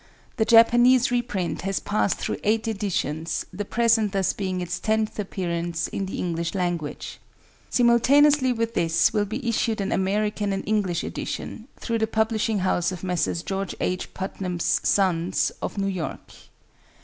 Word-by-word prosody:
The 220 - +2
Japanese 240 +2 +6
reprint 230 -7 -1
has 195 +1 -1
passed 205 -1 0
through - - -3
eight 220 +2 +1
editions, 170 -7 -2
the 205 +3 -3
present 225 -1 +2
thus 195 -2 +1
being 185 -2 -3
its 180 0 -3
tenth 220 -1 -1
appearance 170 -4 -2
in 195 - -4
the - - -5
English 170 0 -2
language. 175 -5 -3 0.5
Simultaneously 260 +3 +4
with 230 -1 -1
this 165 0 +2
will 205 -1 +1
be 230 +5 -5
issued 225 -1 0
an 195 0 -2
American 205 +2 0
and 195 - -4
English 200 -5 0
edition, 225 - -5
through 230 -1 -2
the 220 - +1
publishing 220 0 0
house 175 -1 +1
of 185 -1 -7
Messrs. 180 -2 -1
George 195 0 -3
H. 185 0 -2
Putnam's 185 -2 -1
Sons, 180 -3 +1
of - - -4
New 195 - 0
York. 185 -5 -4
200 Hz, 150 wpm, -24 LUFS, 180-225 Hz, 0.5 s, Japanese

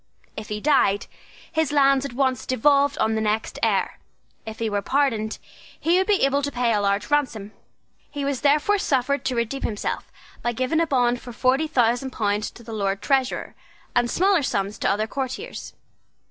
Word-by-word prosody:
If 215 -1 -7
he 210 0 -3
died, 210 -7 +2 0.5
his 320 -2 0
lands 275 -2 +4
at 265 - -6
once 260 -2 0
devolved 280 +3 +3
on 220 - +1
the 220 - 0
next 215 +1 -1
heir. - - 0 0.5
If 220 0 -6
he 225 - -1
were 205 -1 -1
pardoned, 225 -5 0 0.4
he 345 +3 +3
would 380 - 0
be 415 -2 +2
able 275 +1 +1
to 285 0 -2
pay 245 -2 +1
a 210 - +1
large 200 +5 0
ransom. 240 -8 0 0.6
He 285 -1 -4
was 280 -2 -2
therefore 300 +8 +3
suffered 280 -3 0
to 255 - 0
redeem 235 +3 -2
himself 210 -2 -3 0.3
by 240 - -1
giving 255 +7 0
a 335 - +2
bond 245 -3 +1
for 245 - -9
forty 260 +6 +1
thousand 245 -2 +1
pounds 210 -3 -1
to 235 - -15
the 225 0 -8
Lord 195 -2 -2
Treasurer, 265 -2 0 0.4
and 240 -1 +2
smaller 380 +2 +3
sums 205 -5 -2
to - - +1
other 215 +2 +1
courtiers. 265 - -5
255 Hz, 185 wpm, -23 LUFS, 220-280 Hz, 0.6 s, lands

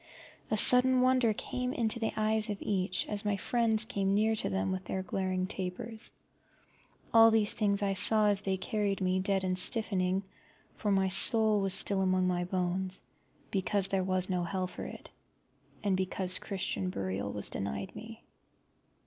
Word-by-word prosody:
A 215 - 0
sudden 250 +3 +6
wonder 255 -2 +3
came 250 +4 -4
in 230 - -1
to 235 - -1
the 225 - -2
eyes 215 0 0
of 205 - -3
each, 185 -2 -1
as 205 -1 -4
my 205 -1 -1
friends 220 0 0
came 195 -2 -1
near 220 +2 +1
to - - -1
them 95 0 -2
with 185 0 -5
their 190 +1 -4
glaring 185 0 -2
tapers. 195 +4 -6 1.0
All 225 0 +7
these 220 -2 +2
things 205 -1 0
I 195 -1 0
saw 210 +2 +5
as 200 -1 0
they 190 -2 -2
carried 200 +1 -2
me 185 0 0
dead 195 0 0
and 185 -1 -1
stiffening, 190 -2 0 0.5
for 210 - -4
my 195 -1 +1
soul 215 +2 +6
was 195 -1 0
still 195 0 0
among 185 -1 +1
my 175 -1 -1
bones, 185 +1 -3 0.5
because 195 0 -1
there 190 -1 0
was 185 0 -1
no 180 -2 -2
hell 185 +2 -3
for 180 - -8
it, - - -11 0.7
and 200 -2 +1
because 185 0 0
Christian 190 -1 -3
burial 100 - -4
was 105 - -3
denied 100 - -5
me. 225 0 -11
195 Hz, 175 wpm, -30 LUFS, 185-215 Hz, 1.0 s, All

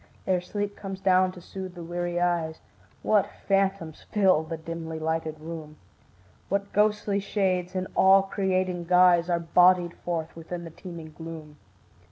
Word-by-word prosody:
Ere 185 -1 +1
sleep 205 +2 -4
comes 195 -1 -7
down 185 -1 +3
to 185 - -12
soothe 185 +1 -8
the 175 - -7
weary 175 +1 -2
eyes, 170 -2 0 0.4
What 210 -2 +3 0.2
phantoms 195 -5 0
fill 190 -6 +4
the 160 +1 -5
dimly 160 0 -6
lighted 160 -1 -2
room; 155 -1 -8 0.7
What 200 +1 -1
ghostly 210 -1 +2
shades 190 -3 -1
in 185 0 -1
awe 190 0 +6
creating 185 -2 -1
guise 180 -1 +5
Are 170 -1 +2
bodied 175 +1 +4
forth 165 -2 -4
within 170 +1 -6
the 165 - -8
teeming 165 -2 -9
gloom. 160 -2 -9
175 Hz, 150 wpm, -27 LUFS, 165-190 Hz, 0.7 s, awe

